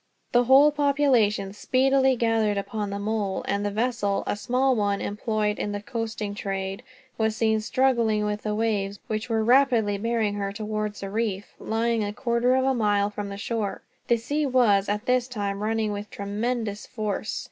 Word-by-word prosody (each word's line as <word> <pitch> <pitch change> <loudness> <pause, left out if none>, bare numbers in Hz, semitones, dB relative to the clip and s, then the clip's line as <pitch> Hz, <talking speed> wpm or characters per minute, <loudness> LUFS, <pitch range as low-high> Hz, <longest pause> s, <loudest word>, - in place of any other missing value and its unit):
The 245 0 +4
whole 275 +4 +7
population 270 -9 +2
speedily 265 +4 +2
gathered 225 -3 +1
upon 205 +1 -3
the 200 - -3
mole, 205 -1 -2
and 200 0 0
the 205 - 0
vessel, 215 -2 -1
a - - -1
small 255 +5 +1
one 205 -2 0
employed 210 0 -1
in 205 - -2
the 205 - -3
coasting 220 -2 -4
trade, 195 0 -4 0.4
was 220 -1 +1
seen 220 -1 +1
struggling 230 -3 +1
with 210 0 -2
the 210 -1 -2
waves, 205 -3 -1
which 215 +2 -3
were 225 -1 +1
rapidly 235 -5 +3
bearing 225 -1 0
her 200 -1 -3
towards 215 -1 -4
a 195 - -5
reef, 205 -2 -2
lying 225 0 0
a 205 0 -3
quarter 240 +2 +1
of 260 0 +2
a 270 - +3
mile 205 -3 +1
from 205 -1 -5
the 200 - -6
shore. 210 -1 -3 0.2
The 235 - +3
sea 285 +6 -1
was, 220 -7 +3
at 210 +2 -2
this 250 -1 +2
time, 200 -5 -3
running 220 0 0
with 205 0 -5
tremendous 210 +1 -3
force. 215 -3 -3
215 Hz, 180 wpm, -25 LUFS, 205-240 Hz, 0.4 s, whole